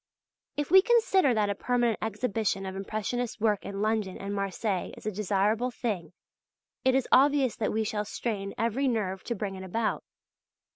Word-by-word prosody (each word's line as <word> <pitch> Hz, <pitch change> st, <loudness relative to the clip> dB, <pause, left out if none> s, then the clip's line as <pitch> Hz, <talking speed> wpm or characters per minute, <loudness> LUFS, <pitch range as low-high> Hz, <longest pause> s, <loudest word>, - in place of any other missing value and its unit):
If 295 Hz, +1 st, -2 dB
we 380 Hz, +1 st, +9 dB
consider 395 Hz, -, +4 dB
that 210 Hz, -2 st, +2 dB
a -, -, +1 dB
permanent 240 Hz, +1 st, 0 dB
exhibition 215 Hz, -2 st, -1 dB
of 190 Hz, 0 st, -5 dB
impressionist 215 Hz, +4 st, -3 dB
work 210 Hz, -2 st, +1 dB
in 200 Hz, +1 st, -4 dB
London 215 Hz, -3 st, 0 dB
and 200 Hz, +1 st, -5 dB
Marseilles 195 Hz, 0 st, -2 dB
is -, -, -13 dB
a 215 Hz, -, 0 dB
desirable 210 Hz, +4 st, +1 dB
thing 205 Hz, -10 st, -3 dB, 0.7 s
it 260 Hz, 0 st, +3 dB
is 265 Hz, -, +1 dB
obvious 275 Hz, -2 st, +4 dB
that 215 Hz, -, 0 dB
we 220 Hz, +1 st, 0 dB
shall 210 Hz, -1 st, -2 dB
strain 200 Hz, -2 st, -4 dB
every 235 Hz, +5 st, +1 dB
nerve 195 Hz, -6 st, -1 dB
to 235 Hz, -, -2 dB
bring 200 Hz, -1 st, -3 dB
it 190 Hz, 0 st, -7 dB
about. 215 Hz, +4 st, -1 dB
215 Hz, 175 wpm, -28 LUFS, 200-245 Hz, 0.7 s, we